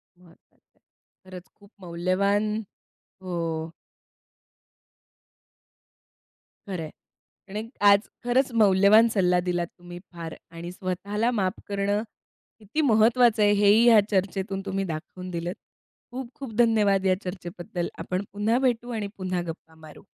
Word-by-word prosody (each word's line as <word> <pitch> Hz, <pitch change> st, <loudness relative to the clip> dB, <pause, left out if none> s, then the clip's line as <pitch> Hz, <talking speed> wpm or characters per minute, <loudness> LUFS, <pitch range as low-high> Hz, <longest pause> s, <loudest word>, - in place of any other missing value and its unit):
महत्वाचं 175 Hz, -2 st, -25 dB
आहे. -, -, -54 dB, 0.5 s
खरंच 185 Hz, -1 st, -10 dB
खूप 200 Hz, +1 st, -19 dB
मौल्यवान, 190 Hz, +4 st, 0 dB, 0.7 s
हो. 165 Hz, -3 st, -3 dB, 3.0 s
खरंय. 170 Hz, -5 st, -4 dB, 0.6 s
आणि 210 Hz, +2 st, -4 dB, 0.3 s
आज 200 Hz, +1 st, +4 dB, 0.2 s
खरंच 255 Hz, +2 st, +2 dB
मौल्यवान 200 Hz, +3 st, +6 dB
सल्ला 180 Hz, -3 st, +3 dB
दिलात 175 Hz, -1 st, -1 dB
तुम्ही 175 Hz, 0 st, -10 dB
फार 165 Hz, -1 st, -7 dB, 0.2 s
आणि 170 Hz, +1 st, -7 dB
स्वतःला 200 Hz, +5 st, -2 dB
माफ 195 Hz, -4 st, -1 dB
करणं 200 Hz, +1 st, 0 dB, 0.6 s
किती 220 Hz, +9 st, -2 dB
महत्वाचं 230 Hz, -2 st, +4 dB
आहे. 205 Hz, -, +5 dB
हे 205 Hz, 0 st, +3 dB
ही 225 Hz, +3 st, +6 dB
या 225 Hz, -2 st, +8 dB
चर्चेतून 195 Hz, 0 st, -1 dB
तुम्ही 195 Hz, 0 st, -2 dB
दाखवून 175 Hz, +3 st, -7 dB
दिलंत. 175 Hz, +1 st, -4 dB, 0.6 s
खूप 255 Hz, -1 st, -6 dB
खूप 265 Hz, -5 st, -8 dB
धन्यवाद 210 Hz, -5 st, +3 dB
या 185 Hz, -1 st, +4 dB
चर्चेबद्दल. 175 Hz, 0 st, -5 dB
आपण 185 Hz, +2 st, -3 dB
पुन्हा 220 Hz, +4 st, +1 dB
भेटू 245 Hz, -2 st, 0 dB
आणि 215 Hz, -3 st, -3 dB
पुन्हा 185 Hz, -2 st, -2 dB
गप्पा 160 Hz, 0 st, -9 dB
मारू. 150 Hz, -, -14 dB
195 Hz, 120 wpm, -26 LUFS, 180-215 Hz, 3.0 s, या